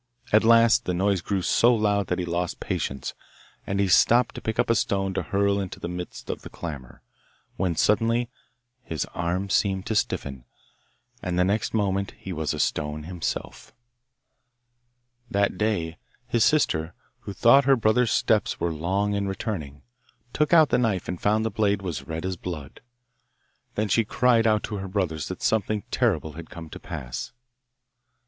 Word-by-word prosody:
At 110 - +6
last 115 0 +5
the 90 - -1
noise 95 0 +1
grew 95 +1 -2
so 120 +6 +4
loud 105 -3 +1
that 90 - -1
he 90 - -2
lost 85 0 -2
patience, 65 -1 -3 0.5
and 100 0 -1
he 100 - +3
stooped 120 +6 +4
to - - -8
pick 110 0 -3
up - - +2
a - - +5
stone 95 -3 0
to - - -1
hurl 100 0 +1
into 95 -2 -5
the - - -4
midst 90 0 -6
of - - -6
the - - -9
clamour, 70 -7 -8 0.5
when 90 -3 -1
suddenly 115 +6 +2 0.6
his 80 - -3
arm 90 +3 -1
seemed 95 -1 +1
to 110 - -2
stiffen, 70 -10 -2 0.8
and 90 -1 -2
the 90 - +4
next 100 +4 0
moment 100 -2 0
he 95 - -7
was 80 -2 -2
a - - -4
stone 75 +1 -1
himself! 85 0 -5 1.5
That 100 -3 +1
day 85 -7 -1 0.3
his 120 -2 +2
sister, 80 - +2 0.2
who 100 - -7
thought 125 +6 +5
her 135 0 +6
brother's 115 +1 +2
steps 110 -2 +1
were 85 -1 -1
long 95 +6 0
in 100 -1 -1
returning, 80 - -5 0.5
took 150 0 +1
out 160 -3 +6
the 125 - +2
knife 105 -7 0
and 90 - -5
found 110 +2 +2
the 110 - -1
blade 100 -1 +1
was 70 -8 -5
red 80 +2 -4
as 95 -1 -2
blood. 80 -5 -7 0.9
Then 105 +1 0
she 115 +4 +3
cried 115 +1 +3
out 105 -1 +2
to 105 - -4
her 95 0 -5
brothers 90 -6 -2
that 95 - -6
something 110 -2 +1
terrible 80 - +1
had 80 +1 -9
come 80 -2 -10
to - - -8
pass. 60 - -6
100 Hz, 175 wpm, -25 LUFS, 85-110 Hz, 1.5 s, At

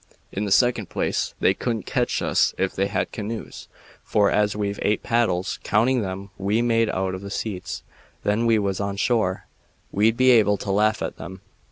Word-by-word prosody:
In 100 +2 -2
the 100 - -3
second 115 -3 +3
place, - - -1
they - - +4
couldn't 115 -5 -3
ketch - - 0
us - - +2
if 95 - 0
they 95 +1 0
had - - -2
canoes, 110 +1 -6 0.4
for, 105 -1 +2
as 105 -1 +2
we've 100 -1 -2
eight 105 - +1
paddles, 110 -6 0
counting 120 +4 +2
them 95 0 -5
we 105 +4 +1
made 115 -2 +2
out 95 0 -1
of 95 - -5
the 100 - -7
seats 95 -5 -4 0.4
when 110 +3 +1
we 115 -1 +4
was 100 -2 -1
on 100 0 -2
shore, 105 -4 0 0.5
we'd 110 +3 +2
be 130 0 +5
able 105 -4 +4
to 100 - -4
laugh 105 +2 +2
at - - -5
'em. 95 +1 -8
105 Hz, 190 wpm, -23 LUFS, 95-115 Hz, 0.5 s, be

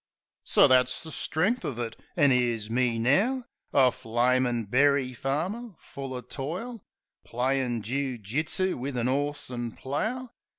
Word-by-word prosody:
So - - +5
that's 130 +2 +3
the 160 - -8
strength 195 +12 0
of 125 - -3
it. 115 -2 -3 0.2
An' 145 -4 +5
'ere's 120 -4 +1
me 120 -1 +1
now 205 - +2 0.3
A 130 -2 +5
flamin' 120 +1 +1
berry 135 +3 +3
farmer, 180 - -3
full 135 -1 -7
o' 125 - -4
toil; 170 - -5 0.4
Playin' 125 -2 -1
joo 130 +2 -2
jitsoo 150 - -1
wiv 135 +1 -4
an 120 0 0
'orse 145 +1 -1
an' 120 -2 -4
plough. 225 - -3
130 Hz, 140 wpm, -28 LUFS, 120-155 Hz, 0.4 s, So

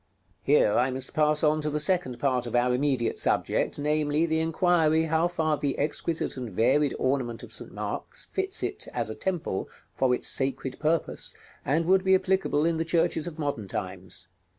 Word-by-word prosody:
Here 140 -7 +3
I 125 +4 +2
must 130 0 -2
pass 150 0 +2
on 155 0 +3
to 150 - -1
the 150 0 -1
second 155 -6 +2
part 125 -3 0
of 120 - -4
our 125 +1 +3
immediate 130 -3 0
subject, - - 0
namely, 150 +1 +1
the 160 -1 0
inquiry 160 -1 +2
how 160 +1 +1
far 160 -3 0
the 140 -2 -2
exquisite 155 +2 -2
and 125 -3 -5
varied 130 +8 +2
ornament 130 -3 -1
of - - -7
St. - - -1
Mark's - - -5
fits 385 +2 -1
it, - - -3
as - - -1
a - - -6
Temple, 175 - -3 0.3
for 130 -1 +2
its - - -4
sacred 135 -1 0
purpose, 160 +2 -1 0.3
and 160 +5 +1
would 190 +2 +3
be 190 0 +5
applicable 190 -5 +1
in 165 -1 +1
the 165 - 0
churches 165 -1 0
of 165 -2 -7
modern 145 -9 -3
times. 95 -2 -6
150 Hz, 185 wpm, -27 LUFS, 130-165 Hz, 0.3 s, be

